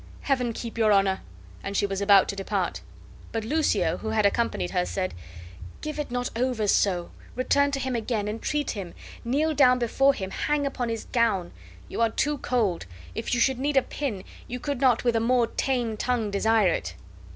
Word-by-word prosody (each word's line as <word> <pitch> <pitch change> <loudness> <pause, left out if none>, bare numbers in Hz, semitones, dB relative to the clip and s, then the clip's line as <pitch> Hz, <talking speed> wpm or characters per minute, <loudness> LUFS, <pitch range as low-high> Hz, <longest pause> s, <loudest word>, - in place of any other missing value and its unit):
Heaven 255 -4 0
keep 230 0 -6
your 215 -1 +4
Honor!" 195 -1 +3 0.4
and 200 0 -3
she - - +2
was 195 0 -3
about 200 -1 +6
to 200 - -2
depart. 195 -1 -2 0.5
But 225 -1 -3
Lucio, 310 +6 +1
who 220 - -5
had 220 -1 +2
accompanied 200 - 0
her, 90 - +1
said: 90 +1 -3 0.7
"Give 305 0 -5
it 295 - -3
not 245 +1 -2
over 240 -3 0
so; 180 -3 +2 0.2
return 285 +3 +2
to 280 -1 -2
him 260 -2 -2
again, 220 -2 -1
entreat 275 +7 -2
him, 190 -5 -6 0.3
kneel 295 +6 +1
down 255 -3 +5
before 270 +3 +3
him, 190 -2 -5
hang 295 +5 0
upon 255 -3 -2
his 225 -1 -3
gown. 220 -8 +1 0.4
You 230 - -4
are 230 - +4
too 295 +5 -1
cold; 215 - 0 0.3
if 245 - -2
you - - 0
should 260 +1 +2
need 280 +1 0
a 265 - +5
pin, 240 -10 -4 0.2
you 250 - -5
could 280 0 -3
not 255 -3 +4
with 240 -2 +2
a - - +3
more 240 +1 +3
tame 240 -2 -1
tongue 230 -3 -1
desire 215 0 +3
it." 85 - -2
235 Hz, 195 wpm, -26 LUFS, 200-260 Hz, 0.7 s, about